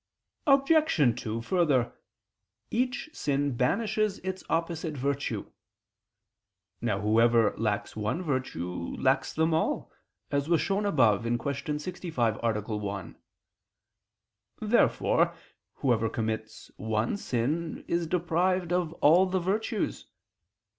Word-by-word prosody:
Obj. 275 - +4
2: 110 +1 -3
Further, 145 -7 +2 0.8
each 255 +5 -1
sin 140 - 0
banishes 210 - +1
its 190 0 -4
opposite 165 -2 -1
virtue. 135 -5 -2 1.3
Now 110 -4 0
whoever 115 +1 +4
lacks 105 -2 -2
one 110 - -2
virtue 90 - -3
lacks - - +2
them 160 +1 +1
all, 160 - 0 0.4
as 140 +2 0
was 170 -2 +4
shown 200 +1 0
above 115 - +4
(Q. 140 +5 -2
65, 150 - -2
A. 115 -2 0 0.2
1). 100 -1 -5 1.4
Therefore - - +2 0.4
whoever 115 -4 +1
commits 110 -1 -4
one 110 - -1
sin, 155 +1 -2
is 170 -1 0
deprived 175 +1 +1
of 175 -3 0
all 175 +6 +6
the 185 0 0
virtues. 195 +5 -2
145 Hz, 105 wpm, -28 LUFS, 115-180 Hz, 1.4 s, all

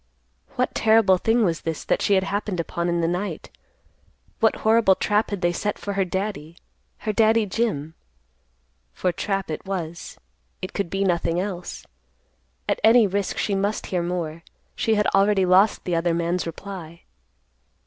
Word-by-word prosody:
What 250 - 0
terrible 220 -4 +4
thing 225 +2 +2
was 165 -3 -1
this 160 -2 -4
that - - 0
she 200 - +3
had 190 - +2
happened 200 -1 -2
upon 170 +1 -2
in 170 0 0
the 165 - +1
night? 180 +4 -3 0.9
What 225 -1 +3
horrible 220 -3 +5
trap 210 +3 +1
had 200 -3 -4
they 175 -1 +2
set 205 +4 -2
for 200 - -4
her 195 0 +1
Daddy, 185 -3 -4 0.5
her 215 - 0
Daddy 220 0 +4
Jim? 185 -8 -2 1.0
For 180 - 0
trap 195 0 -2
it 155 - -5
was. 175 -4 -5 0.4
It 185 - -6
could 200 -4 -2
be 195 +2 -1
nothing 175 -2 +1
else. 180 -2 -5 0.8
At - - 0
any 225 +1 +7
risk 200 0 -2
she 205 - 0
must 200 +2 -1
hear 180 - +1
more. 170 -2 -3 0.3
She 225 - +1
had 210 0 +2
already 195 -1 +4
lost 185 +4 +4
the 175 - -1
other 165 0 +1
man's 170 +1 -1
reply. 170 -1 -8
190 Hz, 165 wpm, -23 LUFS, 170-210 Hz, 1.0 s, any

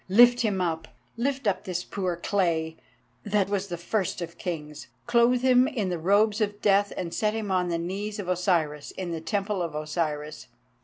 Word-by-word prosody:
Lift 240 +4 +7
him 205 -5 0
up! 160 -2 -1 0.3
Lift 265 +2 -1
up 200 -3 +1
this 180 -1 -3
poor 185 -3 -2
clay, 170 -3 0 0.5
that 205 -2 +1
was 200 -1 -1
the 175 -2 -4
first 185 +2 -1
of 170 -1 -7
kings. 150 -4 -5 0.2
Clothe 240 +1 +4
him 255 0 +5
in 220 -10 -2
the 175 -2 -2
robes 205 +5 +3
of 205 -1 -1
death, 200 0 +3
and 170 -2 -4
set 215 0 0
him 215 -3 -3
on 180 -1 +1
the 170 - 0
knees 195 +5 -4
of 200 -4 -5
Osiris 170 -5 0
in 185 -2 -5
the 165 -1 -4
Temple 200 +4 -1
of 165 -3 -3
Osiris. 150 -1 -3
185 Hz, 190 wpm, -27 LUFS, 170-210 Hz, 0.5 s, Lift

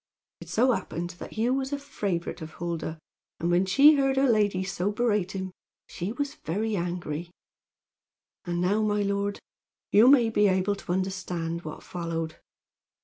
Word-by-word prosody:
It - - -11
so 255 +4 +3
happened 175 -6 -3
that - - -8
Hugh 230 +3 +1
was 270 0 -1
a 285 - 0
favorite 195 -11 -3
with 160 0 -8
Huldah; 165 -2 -4 0.4
and 170 +1 0
when 180 +2 +3
she 285 +9 +7
heard 270 -1 +2
her 270 +1 +4
lady 205 -5 +2
so 190 +1 -1
berate 210 -4 0
him 190 -1 -4 0.3
she 180 +4 -5
was 285 +3 -3
very 210 +7 -1
angry. 175 -2 -3 1.2
"And 175 -1 -2
now, 200 +4 +2
my 210 -1 +1
lord, 200 0 -1 0.5
you 220 +4 +7
may 245 -4 +6
be 210 -1 +4
able 190 +1 +2
to 195 - -6
understand 180 -3 -2
what 155 -2 -8
followed. 165 -2 -4
195 Hz, 160 wpm, -27 LUFS, 175-220 Hz, 1.2 s, she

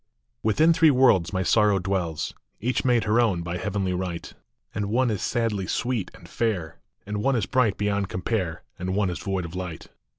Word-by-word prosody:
ITHIN 155 +10 +4
three 160 -1 +5
worlds 125 - +4
my 95 -1 0
Sorrow 105 +1 +4
dwells; 90 -4 -2 0.3
Each 125 +3 0
made 120 -3 +3
her 110 +3 +3
own 95 -8 +1
by 85 +1 -3
heavenly 95 -1 -1
right;,... 90 -2 -4 0.4
And 105 -1 -2
one 120 +3 +2
is 105 - -2
sadly 110 -6 -1
sweet 120 -6 -1
and - - -14
fair, 100 -9 -2 0.3
And 105 +1 -3
one 135 +4 +2
is 110 -5 +1
bright 110 -1 +2
beyond 100 -1 0
compare, 90 -5 -2 0.2
And 95 +1 -2
one 100 -3 +1
is 90 - -5
void 95 -2 -2
of 85 - -8
light. 90 -3 -6
100 Hz, 190 wpm, -25 LUFS, 90-115 Hz, 0.4 s, three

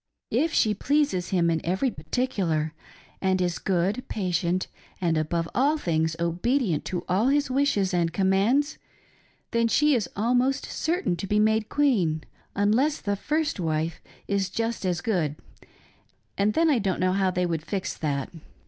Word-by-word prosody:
If 325 +1 +2
she 215 -8 +3
pleases 230 -6 0
him 170 -3 +2
in 160 - 0
every 190 +9 0
par 145 - -13
ticular 175 -12 0 0.5
and 190 -1 +2
is 175 -2 -1
good, 195 +6 0
patient, 180 -2 -1 0.3
and 170 -3 +1
above 165 +2 -1
all 290 +5 +2
things 160 - 0
obedient 175 - 0
to 180 - -3
all 195 +7 +2
his 285 -1 +2
wishes 255 -9 +1
and 170 -2 +1
commands, 200 - +2 0.7
then 230 0 +2
slie 295 +5 +3
is 225 - -1
almost 250 +5 +1
certain 340 - -1
to 195 - -5
be 210 - +1
made 220 0 +2
queen, 190 - +1 0.3
unless 235 +10 +2
the 205 -1 -1
first 300 +4 -1
wife 160 -1 -1 0.3
is 200 -2 0
just 230 0 -2
as 175 -1 -1
good, 175 -8 0 1.0
and 205 +2 +1
then 330 0 +4
I 260 - +3
don't 195 -3 -1
know 185 0 +2
how 190 -1 +2
they 180 0 0
would 165 -3 -1
fix 195 +2 -3
that. 145 0 -3
195 Hz, 160 wpm, -26 LUFS, 175-245 Hz, 1.0 s, then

